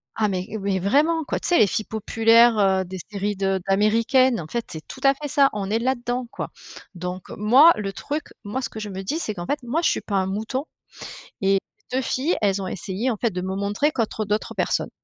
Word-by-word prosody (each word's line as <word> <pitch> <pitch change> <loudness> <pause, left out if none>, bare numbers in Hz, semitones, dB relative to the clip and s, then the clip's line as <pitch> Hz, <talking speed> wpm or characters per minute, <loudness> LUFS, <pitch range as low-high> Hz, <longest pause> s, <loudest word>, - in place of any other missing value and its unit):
Ah 215 - +1
mais 185 -2 -2
et 220 - -4 0.2
vraiment, 305 - +2
quoi! - - -3
Tu - - -5
sais 350 - +4
les 210 - +6
filles 215 +3 -2
populaires, 225 +2 +4
heu, 190 -1 +3
des 185 +1 -7
séries 205 0 -2
de 195 -1 0
d'américaines, 225 +4 +3
en 155 - -8
fait, 235 +4 -3
c'est 160 -1 -8
tout - - -9
à 275 0 +6
fait 290 +1 -7
ça, 275 -1 +4
on 200 -2 -3
est 220 +2 +1
là-dedans, 245 0 -1
quoi! - - -5 0.5
Donc 180 +1 -6
moi 255 +11 +7
le 195 -2 -3
truc 295 +8 -4 0.2
moi 210 +6 -3
ce 235 - -2
que 220 - -8
je 210 - -5
me 190 0 -6
dis, 300 +12 -2
c'est 215 - -3
qu'en 175 -3 -6
fait, 290 +10 -1
moi 270 +8 -1
je - - +3
suis - - -1
pas 205 - -4
un 190 - +1
mouton, 220 +8 -3 0.8
et 195 0 +3 0.3
les 255 - 0
2 - - +2
filles, 265 +6 0
elles 195 -1 +1
ont 190 - -4
essayé, 195 +7 -3
en 240 - 0
fait, 235 +1 0
de 180 0 -4
me 190 +1 -3
montrer 205 +9 0
contre 220 -3 -2
d'autres 210 +1 -2
personnes. - - -1
215 Hz, 240 wpm, -23 LUFS, 195-255 Hz, 0.8 s, moi